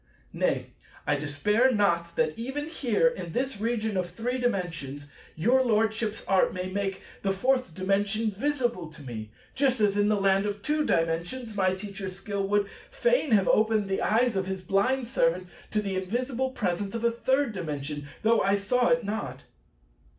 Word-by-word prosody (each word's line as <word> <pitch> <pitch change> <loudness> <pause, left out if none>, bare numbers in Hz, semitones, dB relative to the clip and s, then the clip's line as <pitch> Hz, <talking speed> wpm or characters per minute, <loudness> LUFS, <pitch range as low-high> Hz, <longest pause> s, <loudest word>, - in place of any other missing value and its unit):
Nay, - - 0 0.3
I 145 - +2
despair 150 - +2
not 170 -6 +1
that, 155 - +1
even 265 +6 -4
here, 245 -7 +2
in 180 -9 -3
this 260 -3 -1
region 220 -2 -1
of 180 -1 -1
Three 240 +7 -3
Dimensions, 165 - -2 0.3
your 240 +11 +3
Lordship's 220 -1 0
art 190 -1 +3
may 185 0 -3
make 195 0 -2 0.2
the 195 - +1
Fourth 250 -2 +1
Dimension 200 +3 +1
visible 240 - -1
to 155 -1 -12
me; 110 -4 -6 0.2
just 265 -2 +2
as 205 -2 +3
in 205 0 +3
the 210 -1 +2
Land 195 +1 +3
of 205 0 -4
Two 300 +3 +1
Dimensions 175 +9 -1
my 185 -2 +2
Teacher's 190 -1 -6
skill 195 0 -3
would 205 0 +2 0.2
fain - - +1
have 195 -4 +4
opened 215 -1 +3
the 195 - 0
eyes 230 +1 +2
of 190 -1 -1
his 190 -1 -4
blind 235 +7 +1
servant 180 -7 +1 0.2
to 210 0 0
the 195 -2 -2
invisible 245 +7 -1
presence 200 -4 -2
of 230 - -3
a 235 - +4
Third 260 +2 +1
Dimension, 150 -5 -4 0.2
though 225 +1 +4
I 195 +1 +3
saw 240 +5 +2
it 245 0 +3
not. 210 +2 -4
205 Hz, 170 wpm, -27 LUFS, 185-240 Hz, 0.3 s, have